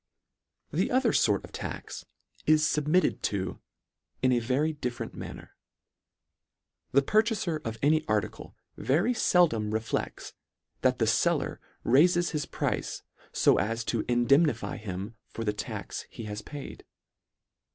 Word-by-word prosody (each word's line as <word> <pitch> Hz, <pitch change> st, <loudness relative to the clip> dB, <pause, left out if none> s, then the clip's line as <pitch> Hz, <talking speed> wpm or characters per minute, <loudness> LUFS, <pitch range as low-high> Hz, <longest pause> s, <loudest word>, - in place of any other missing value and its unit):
The 175 Hz, +6 st, +1 dB
other 255 Hz, -3 st, +2 dB
fort 105 Hz, -3 st, +2 dB
of -, -, -15 dB
tax -, -, -6 dB, 0.4 s
is 155 Hz, 0 st, +5 dB
fubmitted 150 Hz, +5 st, +2 dB
to 95 Hz, -3 st, -2 dB, 0.6 s
in 130 Hz, -, +4 dB
a 120 Hz, -, +3 dB
very 135 Hz, +7 st, 0 dB
different 125 Hz, -5 st, -4 dB
manner. -, -, -9 dB, 1.4 s
The 140 Hz, +1 st, +4 dB
purchafer 210 Hz, -, +1 dB
of 115 Hz, -1 st, -4 dB
any 155 Hz, +2 st, +4 dB
article 105 Hz, -2 st, -2 dB, 0.2 s
very 170 Hz, -, +2 dB
feldom 155 Hz, -, +3 dB
reflects 110 Hz, 0 st, -3 dB, 0.5 s
that -, -, +3 dB
the -, -, +2 dB
feller -, -, +1 dB, 0.2 s
raifes 175 Hz, +7 st, +4 dB
his 150 Hz, -3 st, -2 dB
price -, -, -2 dB, 0.3 s
fo -, -, +4 dB
as 115 Hz, +3 st, 0 dB
to 115 Hz, -1 st, -1 dB
indemnify 140 Hz, +4 st, +3 dB
him 105 Hz, +1 st, -6 dB
for 115 Hz, -, -5 dB
the 105 Hz, -1 st, 0 dB
tax 105 Hz, -, -5 dB
he -, -, -8 dB
has 105 Hz, 0 st, -5 dB
paid. 145 Hz, -2 st, -8 dB
135 Hz, 130 wpm, -28 LUFS, 110-160 Hz, 1.4 s, is